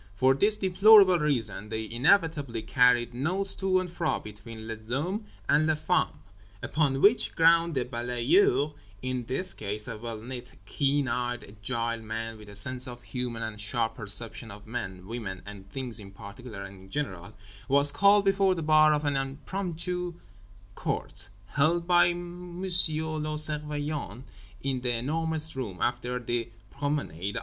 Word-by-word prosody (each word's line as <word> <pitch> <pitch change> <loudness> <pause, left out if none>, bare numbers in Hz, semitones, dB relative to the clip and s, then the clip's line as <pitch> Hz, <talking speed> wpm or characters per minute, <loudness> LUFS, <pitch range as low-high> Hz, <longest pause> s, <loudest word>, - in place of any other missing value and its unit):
For 130 +5 +4
this 205 +10 +3
deplorable 195 -1 +6
reason 115 -8 -2
they 110 0 -4
inevitably 140 - +1
carried 120 0 +3
notes 180 +10 -1
to 190 -1 +1
and 185 - -3
fro 170 -2 -2
between 110 +1 -10
les 110 -1 -8
hommes 180 - -2 0.2
and 155 +2 +3
les 160 -1 +1
femmes. 155 - 0 0.5
Upon 140 -3 0
which 215 +4 +4
ground 165 0 +4
the 130 -2 0
balayeur 125 +5 +1 0.3
in 130 -1 -3
this 135 +10 +1
case—a 105 +2 -5
well 115 -1 -6
knit 125 +1 -8
keen 140 +4 0
eyed 120 0 -2
agile 115 +2 -3
man, 110 0 -5
with 105 -1 -13
a 100 - -11
sense 125 +5 +2
of 120 -1 -9
humour 125 -3 -4
and 110 -2 -4
sharp 115 +1 -1
perception 110 +1 +3
of 105 +1 -11
men, 95 -6 -6
women 105 -4 -6
and 100 -1 -11
things 125 0 0
in 100 -2 -10
particular 100 +1 -10
and 95 -1 -11
in - - -18
general—was 105 +4 0
called 200 0 +4
before 195 -1 +3
the 165 - -4
bar 155 0 +5
of 150 0 -3
an 145 -1 0
impromptu 170 +5 -3 0.6
court, - - -4 0.2
held 160 - +1
by 175 0 +5
M. 175 0 -7
le - - -2
Surveillant 150 - 0 0.4
in 135 -2 -1
The 125 -1 0
Enormous 160 +5 -2
Room 110 -9 -5
after 120 0 -1
the 120 -1 -3 0.2
promenade. 140 - -3
130 Hz, 150 wpm, -28 LUFS, 110-160 Hz, 0.6 s, deplorable